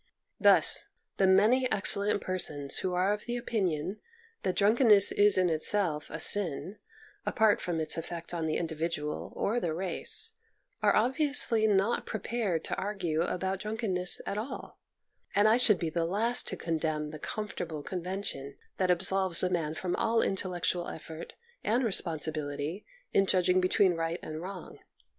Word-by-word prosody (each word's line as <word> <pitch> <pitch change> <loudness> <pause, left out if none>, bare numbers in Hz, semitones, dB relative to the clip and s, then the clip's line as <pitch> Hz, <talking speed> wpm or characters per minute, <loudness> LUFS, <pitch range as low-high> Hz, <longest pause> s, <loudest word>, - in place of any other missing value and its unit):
Thus - - +4 0.3
the 190 - +3
many 225 +7 +3
excellent 205 0 +4
persons 150 -6 -1
who 180 -1 -3
are 185 +3 +1
of 210 - -7
the 240 0 -4
opinion 190 -5 -3 0.4
that 185 - -2
drunkenness 210 -1 +5
is 205 -1 +3
in 185 -1 +2
itself 160 -1 +3
a 165 - -7
sin, 190 +2 +3 0.4
apart 220 -2 +1
from 170 -2 -3
its 160 - 0
effect 170 +1 -7
on 165 -2 -3
the 155 - -1
individual 160 -2 -4
or 230 +4 -1
the 165 -7 -3
race, 190 - +2 0.5
are - - +2
ob 245 +5 +1
viously 275 -7 +3
not 200 +3 0
prepared 215 -5 -3
to - - -3
argue 185 -6 -3
about 190 +2 -3
drunk 215 +2 -6
enness 180 -5 +2
at 200 - -4
all, 235 +6 -8 0.6
and 205 +1 +4
I 220 +2 +4
should 225 -5 +4
be 165 -2 -4
the 170 0 -1
last 225 +8 +3
to - - -3
condemn 155 -2 -3
the 155 0 -9
comfortable 175 -6 -6
convention 180 -7 -5 0.2
that 185 -1 0
absolves 190 0 +2
a 180 - 0
man 160 -3 -2
from 180 +2 -3
all 225 0 +1
intellectual 180 -2 -2
effort 160 0 -9 0.3
and 240 +4 0
responsibility 155 -3 -2 0.3
in 195 0 +2
judging 185 0 +2
between 185 0 +2
right 165 +1 -3
and 155 0 -7
wrong. 185 -1 -9
185 Hz, 155 wpm, -29 LUFS, 165-210 Hz, 0.6 s, drunkenness